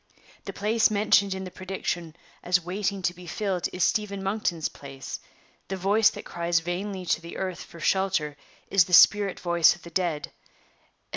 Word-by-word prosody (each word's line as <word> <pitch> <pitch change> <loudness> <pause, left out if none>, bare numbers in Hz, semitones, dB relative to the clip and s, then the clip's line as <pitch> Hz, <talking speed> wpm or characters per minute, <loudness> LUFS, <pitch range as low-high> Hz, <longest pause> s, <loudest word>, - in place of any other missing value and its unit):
The - - -4
place 215 +2 +2
mentioned 200 -2 +3
in 190 - -5
the 185 - -7
prediction 175 -3 -4 0.3
as 180 0 +2
waiting 195 +1 -2
to 175 - +1
be 180 0 -13
filled 190 0 -1
is 180 - -1
Stephen 200 -2 0
Monkton's 190 -5 -1
place; 135 -1 -8 0.5
the 190 - -4
voice 205 +4 +4
that - - -9
cries 170 0 0
vainly 185 +3 -4
to 165 - 0
the 170 0 -8
earth 185 -2 -3
for 170 - -12
shelter 185 -5 +1 0.4
is 190 -3 +5
the 180 - -8
spirit 200 +2 +6
voice 170 -2 +4
of 175 - -19
the 170 - -11
dead. 170 -4 -1
185 Hz, 170 wpm, -26 LUFS, 170-195 Hz, 0.5 s, spirit